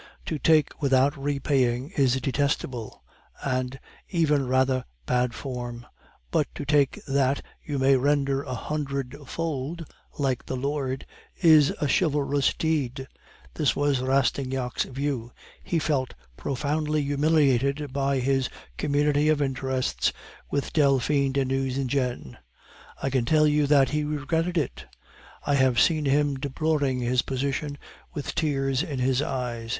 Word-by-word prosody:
To 155 - -3
take 155 -1 +3
without 135 +1 +3
repaying 135 -2 0
is 130 -3 +3
detestable, 130 -3 -2 0.4
and 130 0 -2 0.3
even 150 -6 +2
rather 130 0 +2 0.2
bad 125 - +1
form; 120 -3 -6 0.5
but - - +2
to - - -5
take 145 -1 +2
that 135 0 +1 0.2
you 145 -2 -3
may 135 +1 +4
render 140 0 +1
a 130 -3 -5
hundred 140 -1 -3
fold, 165 +1 -3 0.3
like 135 -4 0
the 130 - -2
Lord, 135 0 -2 0.3
is 155 -5 +6
a 150 - 0
chivalrous 145 -2 +2
deed. 135 -5 -1 0.5
This 150 -3 +1
was 145 -3 +1
Rastignac's 130 -1 0
view. 135 -3 -3 0.3
He 170 - -1
felt 140 - -1 0.2
profoundly 150 - -1
humiliated 140 -1 +2
by 140 0 +1
his 135 0 +1 0.3
community 145 +1 +2
of 155 -1 +3
interests 130 - 0 0.4
with 140 - -2
Delphine 140 -1 +3
de 135 -1 +1
Nucingen; 130 - -1 0.7
I 135 - 0
can 130 -2 +2
tell 155 +3 +4
you 150 -1 +3
that 140 -2 +5
he 150 0 0
regretted 160 +4 -1
it; 145 -6 -2 0.6
I 145 - +1
have 130 -3 +3
seen 155 -2 +3
him 140 0 +2
deploring 140 -2 0
his 125 +1 +2
position 140 +2 -2 0.4
with 145 - -4
tears 135 -3 0
in 155 -6 -4
his 130 +1 +1
eyes. 125 -6 -3
140 Hz, 130 wpm, -26 LUFS, 130-145 Hz, 0.7 s, is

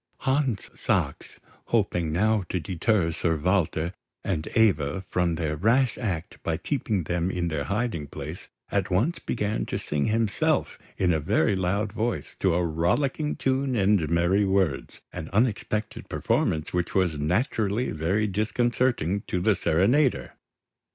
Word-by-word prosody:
Hans 130 -5 0
Sachs, - - -2 0.3
hoping 85 -3 0
now 105 +6 +2
to 90 - -1
deter 85 +2 +1
Sir 80 0 0
Walter 85 0 0 0.3
and 80 -5 -2
Eva 95 -7 +3
from 90 -2 0
their 80 -2 -2
rash 120 - +2
act 95 -10 -4
by 80 -1 -1
keeping 110 - -1
them 85 +2 -1
in 90 -2 -1
their 75 -3 -2
hiding 100 -8 -2
place, 75 +6 -7 0.2
at - - 0
once 120 - +1
began 105 -2 -2
to - - -2
sing 75 -1 -1
himself 110 -1 0 0.2
in 90 -2 +2
a 80 - +1
very 80 +5 +2
loud 100 +3 -1
voice, 115 +1 -2
to 95 -3 +2
a 90 0 +1
rollicking 130 - 0
tune 135 0 0
and 95 -6 +2
merry 85 +4 +3
words; 95 -8 0
an 80 - -6
unexpected 105 -1 -1
performance 80 -1 0
which 90 -1 -1
was 90 -6 +1
naturally 105 - 0
very 85 +7 0
disconcerting 110 -1 0
to 90 - -1
the 105 +3 +3
serenader. 120 - +2
95 Hz, 145 wpm, -26 LUFS, 85-110 Hz, 0.3 s, Eva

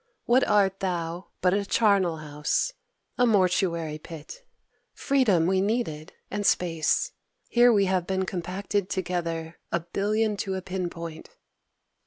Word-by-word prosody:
What 250 +2 +4
art 195 -2 +3
thou 175 -1 -3
but 180 0 +3
a 200 +1 +1
charnel 195 -5 +2
house, 150 - -1 0.5
a 245 - +5
mortuary 175 -6 +1
pit? 165 - -10 0.5
Freedom 230 - +2
we 190 +1 +2
needed, 195 -8 -2 0.2
and 205 +1 -2
space: 175 - +1 0.4
here 240 0 +5
we 200 -3 +4
have 185 -2 0
been 190 0 0
compacted 190 +2 -2
together, 170 -3 -3
a 170 - +1
billion 210 +5 0
to 195 -1 -2
a 190 - -3
pin 185 -1 -3
point! 165 -2 -8
185 Hz, 135 wpm, -26 LUFS, 170-205 Hz, 0.5 s, a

